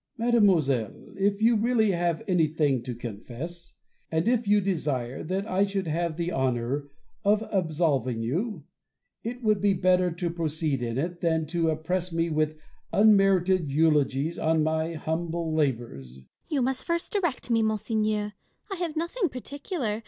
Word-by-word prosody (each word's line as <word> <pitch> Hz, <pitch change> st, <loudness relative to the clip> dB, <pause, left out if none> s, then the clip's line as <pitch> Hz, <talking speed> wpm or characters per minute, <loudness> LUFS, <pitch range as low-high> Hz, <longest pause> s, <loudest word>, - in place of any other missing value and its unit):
Bossuet. 235 Hz, +1 st, 0 dB
Mademoiselle, 155 Hz, -, +2 dB
if 200 Hz, +2 st, 0 dB
you 230 Hz, +1 st, +5 dB
really 220 Hz, -1 st, +2 dB
have 170 Hz, -2 st, 0 dB
anything 155 Hz, -, +2 dB
to 125 Hz, 0 st, -5 dB
confess, 120 Hz, +10 st, -8 dB, 0.3 s
and 160 Hz, +4 st, 0 dB
if 235 Hz, -2 st, +2 dB
you 205 Hz, +1 st, +5 dB
desire 145 Hz, -10 st, -2 dB
that 190 Hz, +4 st, -2 dB
I 195 Hz, -1 st, +1 dB
should 195 Hz, -1 st, -1 dB
have 165 Hz, 0 st, -1 dB
the 170 Hz, +1 st, -1 dB
honour 130 Hz, 0 st, -1 dB, 0.3 s
of 210 Hz, +2 st, +2 dB
absolving 150 Hz, -, 0 dB
you, 175 Hz, -, -2 dB, 0.6 s
it 245 Hz, +2 st, -5 dB
would 215 Hz, -3 st, +2 dB
be 200 Hz, -1 st, +3 dB
better 180 Hz, 0 st, +3 dB
to 170 Hz, 0 st, -3 dB
proceed 155 Hz, -4 st, -1 dB
in 115 Hz, 0 st, -2 dB
it, 170 Hz, +5 st, -3 dB
than 160 Hz, -2 st, +1 dB
to 165 Hz, -1 st, +1 dB
oppress 170 Hz, +3 st, -1 dB
me 165 Hz, 0 st, 0 dB
with 155 Hz, 0 st, 0 dB, 0.3 s
unmerited 195 Hz, -5 st, +4 dB
eulogies 150 Hz, 0 st, +2 dB
on 160 Hz, -1 st, +2 dB
my 160 Hz, +1 st, 0 dB
humble 165 Hz, +1 st, -2 dB
labours. 120 Hz, -, -1 dB
Fontanges. 65 Hz, -1 st, -17 dB, 0.2 s
You 290 Hz, -4 st, 0 dB
must 260 Hz, +1 st, -1 dB
first 335 Hz, 0 st, -2 dB
direct 345 Hz, -, -1 dB
me, 225 Hz, -1 st, +4 dB
monseigneur: 215 Hz, -1 st, 0 dB, 0.4 s
I 390 Hz, -, -3 dB
have 340 Hz, -3 st, -3 dB
nothing 340 Hz, +4 st, -1 dB
particular. 260 Hz, -, -4 dB
170 Hz, 155 wpm, -27 LUFS, 155-210 Hz, 0.6 s, you